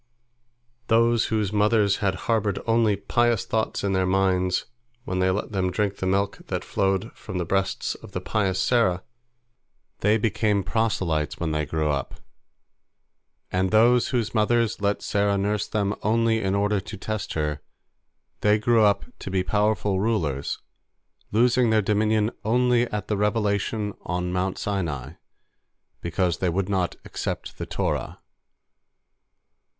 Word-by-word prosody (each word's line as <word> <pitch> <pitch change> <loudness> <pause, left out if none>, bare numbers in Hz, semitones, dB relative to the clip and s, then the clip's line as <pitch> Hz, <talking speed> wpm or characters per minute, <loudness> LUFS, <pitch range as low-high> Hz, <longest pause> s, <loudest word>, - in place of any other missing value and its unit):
Those 115 0 +3
whose 105 -2 -1
mothers 105 -1 +3
had 100 -3 0
harbored 105 -4 +1
only 115 -2 +3
pious 120 +2 +1
thoughts 110 -2 -1
in 100 -1 0
their 95 -1 +1
minds 95 -1 +1 0.4
when 90 -5 -2
they 95 0 +3
let 95 +3 -2
them 95 -3 0
drink 100 +1 -1
the 95 - -2
milk 100 +1 +1
that - - -3
flowed 95 -1 0
from 90 - -7
the 90 - -1
breasts 95 +2 -1
of - - -13
the - - -3
pious 95 -3 -1
Sarah, 110 -7 +2 1.0
they 105 +2 +3
became 105 -2 +1
proselytes 90 -7 -1
when 80 -2 -1
they 75 -1 -1
grew 75 0 0
up; 70 -3 -3 1.4
and 95 +1 +1
those 120 +3 +4
whose 120 -4 -1
mothers 115 0 +1
let 100 0 0
Sarah 100 0 +1
nurse 105 +1 0
them 100 -1 0
only 115 +1 +2
in 95 0 0
order 105 0 +1
to 105 +3 -8
test 110 +2 -4
her, 75 -2 -2 0.8
they 105 0 +3
grew 115 +1 +3
up 100 -1 +3
to - - -6
be 95 -1 0
powerful 105 0 +1
rulers, 85 -11 -1 0.7
losing 120 +2 +3
their 110 -1 +3
dominion 105 +2 +2
only 125 +1 +2
at 105 -2 -4
the 105 - -1
revelation 105 0 0
on 90 0 -3
Mount 90 +1 -1
Sinai, 80 -9 -3 0.9
because 85 0 -1
they 90 - +1
would 95 +3 -1
not 95 -3 0
accept - - -5
the - - -4
Torah. - - -2
100 Hz, 145 wpm, -25 LUFS, 95-110 Hz, 1.4 s, those